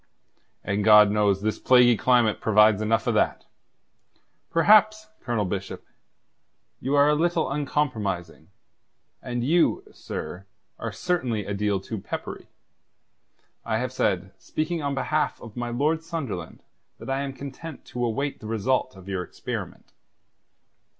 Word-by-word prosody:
"And 100 +1 -1
God 105 -1 +7
knows 105 -2 +2
this 110 0 -1
plaguey 125 -2 +5
climate 120 -2 +2
provides 105 -1 +4
enough 110 +1 +1
of - - +1
that. - - 0 1.0
Perhaps, 215 +4 +4
Colonel 115 -4 -1
Bishop, 95 +1 -5 0.9
you 135 +3 -1
are 145 0 +5
a 150 - +4
little 165 -2 +1
uncompromising; 115 - -2 0.7
and 120 -1 -3
you, 170 - +2
sir, - - -7 0.3
are - - -4
certainly 130 - -1
a 100 - -3
deal 100 -1 0
too 105 +3 -6
peppery. - - -6 1.2
I 110 -1 -1
have 125 +2 -3
said, 95 -5 0
speaking 160 +1 -3
on 140 -1 -2
behalf 150 +3 -1
of 115 -3 -11
my 120 -1 -3
Lord 150 +7 0
Sunderland, 165 - -6 0.3
that - - -11
I 135 +1 0
am 140 -1 -3
content 140 +3 -9
to 120 - -5
await 135 +5 -2
the 110 - -9
result 115 +2 0
of 95 0 -14
your 95 -2 -2
experiment." - - -7
120 Hz, 135 wpm, -25 LUFS, 105-145 Hz, 1.2 s, God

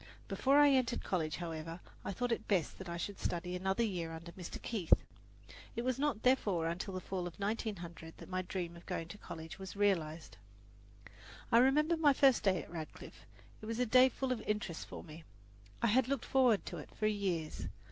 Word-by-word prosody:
Before 275 +2 +3
I 290 -1 +8
entered 255 -3 +2
college, 160 -5 -1
however, 165 0 -5
it - - -19
was - - -3
thought 235 -3 -1
best 185 -7 +1
that 190 -2 -7
I 170 - -3
should 200 +3 -4
study 180 +1 -2
another 190 +5 +1
year 175 -7 -2
under 165 +1 -8
Mr. 180 -1 -7
Keith. 205 -8 +1 0.8
It 235 - -1
was 255 0 0
not, 285 -7 0
therefore, 205 -10 +3
until 180 +3 -3
the - - -1
fall 185 -1 -3
of 175 - -8
1900 190 -6 -4
that - - -10
my 185 0 -1
dream 175 -2 -4
of 170 - -14
going 165 0 -3
to 205 - -9
college 160 +3 -8
was 190 0 -7
realized. 170 -6 0 1.1
I 230 - +7
remember 300 +6 +4
my 300 -3 +5
first 265 -2 +5
day 185 -3 +2
at - - -14
Radcliffe. 160 -3 -8 0.3
It 215 - -7
was 225 0 -2
a 250 - +2
day 255 +3 +7
full 260 +1 -2
of 240 -3 -1
interest 210 -6 -2
for - - -8
me. 160 +1 -11 0.6
I - - +5
had 250 +3 +4
looked 275 -2 -1
forward 250 -6 +4
to 175 - -5
it 150 - -8
for 215 - -1
years. 190 -7 -1
195 Hz, 200 wpm, -35 LUFS, 170-240 Hz, 1.1 s, I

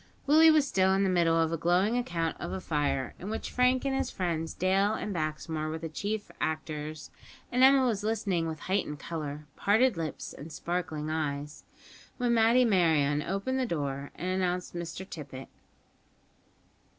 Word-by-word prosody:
Willie 315 +3 +7
was 305 -3 +4
still 190 -4 +3
in 195 - +2
the 190 - +2
middle 165 -2 +3
of 165 0 +2
a 165 - -1
glowing 180 +7 +2
account 170 -9 -1
of - - -5
a 190 - -3
fire, 140 -6 -1
in 190 - -6
which 220 - -4
Frank 250 +1 +2
and 270 -1 0
his 270 - -1
friends 165 -3 -2
Dale 195 +3 +2
and 210 - -4
Baxmore 155 -1 -3
were 160 - -3
the 165 0 -6
chief 205 +6 -4
actors; 155 -1 -4 0.4
and 250 - +1
Emma 265 0 +7
was 215 -4 0
listening 200 -6 0
with 160 -2 -5
heightened 185 -6 -1
colour, 150 -1 -5
parted 220 +1 +3
lips, 160 -3 -4
and 155 +3 -10
sparkling 155 -2 -3
eyes, 150 -2 -3 0.5
when 245 -2 +1
Matty 230 +2 +5
Merryon 160 -8 +3
opened 200 - -2
the 255 - 0
door 140 -5 -3
and 180 - -5
announced 180 -1 -1
Mr 175 +2 -6
Tippet. 135 -6 -8
175 Hz, 170 wpm, -29 LUFS, 155-210 Hz, 0.5 s, Willie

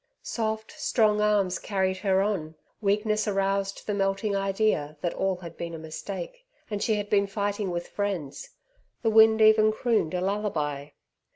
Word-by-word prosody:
Soft, 220 -1 -3
strong 210 -3 +2
arms 205 -3 +2
carried 190 -2 -1
her 190 0 +2
on. 170 -7 -2 0.3
Weakness 210 +1 +1
aroused 195 0 -1
the 210 - -1
melting 195 +1 0
idea 195 -6 0
that 175 - -1
all 190 -1 0
had 175 -2 -10
been 170 -1 -5
a - - -6
mistake, 175 - -7 0.3
and 205 -1 -2
she 220 - +2
had 205 0 -3
been 200 -1 +2
fighting 200 0 -2
with 175 0 -3
friends. 190 -9 -4 0.5
The 225 - +2
wind 220 0 +6
even 215 0 +6
crooned 215 -7 0
a 180 - -1
lullaby. 160 -8 -2
200 Hz, 160 wpm, -27 LUFS, 185-215 Hz, 0.5 s, wind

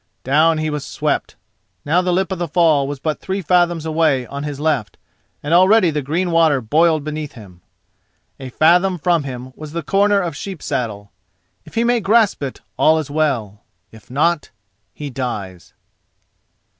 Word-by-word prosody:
Down 155 +4 +3
he 155 0 -2
was 150 -1 -3
swept—now 160 +3 -3
the 180 0 -1
lip 190 +2 0
of 190 - -3
the 175 - -2
fall 155 -3 +3
was 145 -1 -5
but 155 +2 -2
three 195 +1 -3
fathoms 175 -2 +1
away 155 -5 +1
on 140 +3 -7
his 145 -1 -5
left, 150 -8 -1 0.5
and 145 +3 -1
already 185 +1 +5
the 150 -1 -2
green 170 +6 -1
water 165 -4 +3
boiled 155 +6 +2
beneath 150 -1 -5
him. 95 -6 -14 0.8
A 130 -1 -7
fathom 180 +7 +3
from 170 -2 +1
him 130 -1 -7
was 155 -1 -9
the 170 -1 -3
corner 200 +5 +2
of 170 -5 -3
Sheep 190 0 -7
saddle. 105 -4 -4 0.5
If - - -15
he 230 - +2
may 240 0 +2
grasp 215 -2 +2
it, 135 -2 -5 0.2
all 160 +1 +5
is 150 -3 -4
well; 125 -10 -1 0.3
if 110 -2 -17
not, 150 +4 0 0.4
he 145 -2 -7
dies. 105 -9 -6
155 Hz, 170 wpm, -19 LUFS, 135-175 Hz, 0.8 s, already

